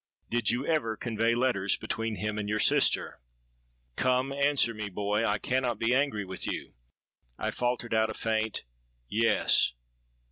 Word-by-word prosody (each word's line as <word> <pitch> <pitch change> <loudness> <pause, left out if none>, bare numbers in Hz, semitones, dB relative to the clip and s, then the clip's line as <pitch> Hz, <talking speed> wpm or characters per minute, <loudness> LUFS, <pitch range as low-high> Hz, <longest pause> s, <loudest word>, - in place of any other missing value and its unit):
did 120 -2 +1
you 120 +4 0
ever 115 -10 0
convey 115 0 0
letters 120 -6 +1
between 115 0 -3
him 105 +2 -3
and 105 -1 -3
your 105 - 0
sister? - - +3 0.8
Come, 130 +1 +1
answer 140 -3 +3
me, 110 -1 -5
my - - -5
boy: 100 +2 -1
I 105 -2 +1
cannot 125 +2 -1
be 115 +2 +1
angry 130 -7 +1
with 95 -1 -4
you.'—I - - -7
faltered 120 -1 -2
out 110 0 +3
a 110 - -5
faint 110 -1 -1 0.4
'Yes.' 110 - +2
115 Hz, 150 wpm, -29 LUFS, 105-125 Hz, 0.8 s, sister